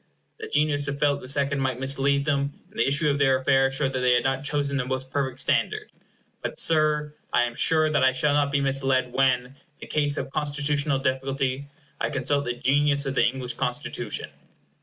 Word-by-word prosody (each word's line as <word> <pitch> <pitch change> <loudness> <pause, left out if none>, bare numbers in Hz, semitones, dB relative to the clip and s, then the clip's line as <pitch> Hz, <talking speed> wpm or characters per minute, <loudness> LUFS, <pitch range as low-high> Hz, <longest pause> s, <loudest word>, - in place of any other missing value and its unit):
The - - -6
genius 145 -1 +1
of 140 -1 -3
Philip 140 -1 +1
the 130 - -9
Second 140 0 +1
might 130 -2 -1
mislead 140 +1 +1
them, 140 -1 0 0.2
and 220 - -10
the - - +3
issue 150 +3 +2
of 140 - -2
their 135 -2 +4
affairs 135 0 +2
showed 135 -1 0
that 130 - -1
they 125 -1 +3
had 120 - +2
not 135 0 -1
chosen 145 -1 -1
the 130 - 0
most 130 0 -4
perfect 135 -2 -2
standard; - - 0 0.5
but, - - -5
Sir, 150 -2 +2 0.2
I 120 - +3
am 120 -1 -2
sure 155 +5 +3
that 150 -3 +1
I 130 - +5
shall 135 +3 +1
not 145 -1 +1
be 140 0 +1
misled 135 -2 0
when, 130 -2 +2
in 130 +2 -17 0.3
a - - -6
case 145 -1 0
of 135 0 -4
constitutional 145 -1 0
difficulty, 135 +1 -2 0.3
I - - -1
consult 140 +2 0
the 120 - -1
genius 140 +3 +2
of 135 - -2
the - - +2
English 125 0 -3
Constitution. - - -4
140 Hz, 205 wpm, -25 LUFS, 130-145 Hz, 0.5 s, I